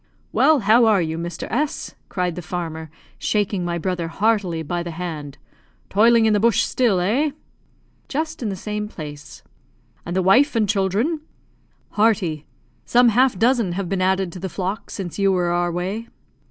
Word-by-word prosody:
"Well, 310 -4 +4
how 225 +4 +5
are 210 -3 +4
you, 160 -1 -2
Mr. 170 0 -5
S 290 +5 -2
?" - - -41
cried 180 -2 -1
the 180 - -6
farmer, 160 -2 -5 0.3
shaking 205 -3 0
my 170 0 -2
brother 175 -1 -2
heartily 195 -3 0
by 175 +3 -2
the 170 - -5
hand. 160 -4 -6 0.5
"Toiling 225 +3 +5
in 220 - +4
the 205 - +3
bush 230 0 +3
still, 230 -8 +1
eh?" 235 +12 +1 0.8
"Just 315 +2 -3
in 225 - -1
the 195 - -3
same 210 +2 -4
place." 145 -7 -9 0.6
"And 175 - -5
the 190 - +2
wife 245 +10 +4
and 220 -2 +2
children?" 210 - 0 0.7
"Hearty. 200 -8 +1 0.4
Some 245 0 +4
half 250 0 +3
dozen 230 -3 +2
have 185 -1 -3
been 190 -1 -1
added 190 -1 +1
to 180 - -9
the 190 +1 -4
flock 195 +3 -4
since 190 -1 -6
you 195 -1 +3
were 180 -2 +1
our 175 0 +1
way." 190 +7 -3
190 Hz, 175 wpm, -22 LUFS, 175-225 Hz, 0.8 s, how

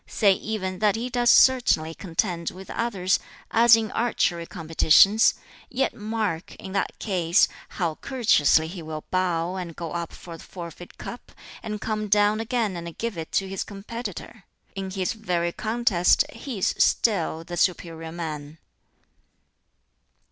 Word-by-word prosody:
Say 200 -3 +3
even 190 -3 -4
that 210 -1 +3
he 240 +3 -4
does 240 -1 +2
certainly 235 -14 +5
contend 170 -1 -2
with 190 +1 -10
others, 195 -5 0 0.3
as 230 0 +7
in 220 -1 -2
archery 175 -8 0
competitions; 170 +5 +4 0.3
yet 265 +1 0
mark, 215 -6 -3
in 190 - -9
that 195 0 -2
case, 175 -5 +2 0.2
how 170 -4 -2
courteously 160 - +3
he 175 +1 -7
will 155 -1 -7
bow 180 -1 0
and 170 -3 -6
go 165 -2 -6
up 170 -1 -4
for 165 -2 -10
the - - -12
forfeit 175 -1 -10
cup, 240 - -9 0.3
and 210 -1 -5
come 215 0 -2
down 205 +1 +3
again 225 -3 -1
and 170 -1 -7
give 230 -3 -3
it 160 -1 -6
to 195 - +1
his 195 0 -3
competitor. 205 0 -8 0.3
In 195 -1 -5
his 190 +1 -2
very 180 -6 -1
contest 220 -1 +2
he 265 -6 -6
is 190 - +1
still 170 -7 +2
the 175 +1 -7
superior 165 -2 -1
man." 155 -3 -6
190 Hz, 150 wpm, -25 LUFS, 170-220 Hz, 0.3 s, as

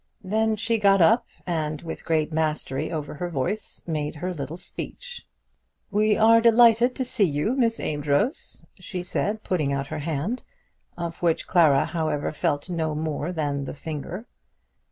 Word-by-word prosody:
Then 220 +3 +1
she 225 +1 0
got 195 -1 +5
up, 220 +8 +5 0.2
and, 155 -3 -2
with 165 - -7
great 160 -1 +1
mastery 155 -4 -1
over 150 -3 -4
her 175 +4 -4
voice, 175 +8 -3
made 150 -3 -2
her 180 +4 -3
little 150 +1 -5
speech. 485 - -7 0.6
"We 210 +1 +3
are 225 +1 +6
delighted 235 +1 +6
to 260 - -1
see 245 -4 +2
you, 150 - 0
Miss 230 -4 +1
Amedroz," 145 - 0
she 180 -3 -5
said, 210 +4 -1
putting 155 -7 0
out 140 0 -1
her - - -3
hand, 160 - -2 0.6
of 170 -1 -5
which 170 -2 +1
Clara, 155 -6 +4
however, 155 -3 -1
felt 145 0 -1
no 160 -4 -1
more 155 +1 -2
than 145 -4 -2
the - - -6
finger. 160 +8 -6
170 Hz, 155 wpm, -25 LUFS, 150-215 Hz, 0.6 s, are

